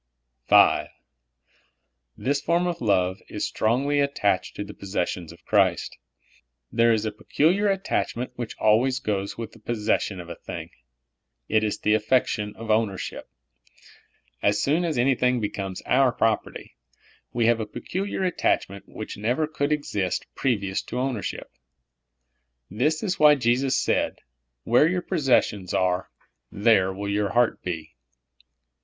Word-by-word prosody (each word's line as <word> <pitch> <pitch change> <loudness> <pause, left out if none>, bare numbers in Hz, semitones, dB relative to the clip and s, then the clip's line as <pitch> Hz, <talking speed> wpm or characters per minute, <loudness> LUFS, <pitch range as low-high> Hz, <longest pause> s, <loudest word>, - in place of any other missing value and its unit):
V. - - +6 1.3
This 140 +2 0
form 170 +3 +1
of 175 -1 -3
love 95 -4 +1
is - - -3
stroiigly 135 +6 +1
attached 105 -9 0
to 105 - -4
the 105 0 -9
possessions 90 -3 -3
of 85 0 -17
Christ. 95 -5 +2 0.8
There 115 0 +4
is 110 -1 +1
a 110 - -1
peculiar 175 - +1
attachment 185 -10 -2
w^hich 120 -2 -5
always 120 +5 +3
goes 100 -5 -3
with 115 -1 -6
the 115 - -17
possession 105 -3 -1
of 85 - -8
a 85 - -6
thing. - - -8 0.8
It 110 0 +2
is 105 - -1
the 105 - +1
affection 110 -1 +1
of 115 -1 -4
ownership. 110 -3 -1 1.1
As 105 0 +2
soon 155 +9 +1
as 160 -5 -1
anything 125 0 +2
becomes 100 -3 -4
our 130 -1 +3
propert}^ 115 -1 -1 0.6
we 120 -1 +1
have 115 0 +3
a 110 - -3
peculiar 190 - -4
attachment 100 - 0
which 110 - -7
never 120 +9 0
could 150 -1 -2
exist 105 -11 -1
previous 100 -7 -1
to - - -9
owaiership. 125 -6 -2 1.3
This 150 +10 0
is 190 -4 -1
why 150 -1 +7
Jesus 130 +1 +1
.said, - - 0 0.2
" - - -54
Where 125 +6 +4
3'our 180 0 -2
po.ssessions 115 - +1
are, 90 0 0 0.4
there 100 -3 +3
will 100 +2 -5
your 100 0 0
heart 120 -1 +2
be." 80 -3 -5
115 Hz, 140 wpm, -25 LUFS, 100-135 Hz, 1.3 s, why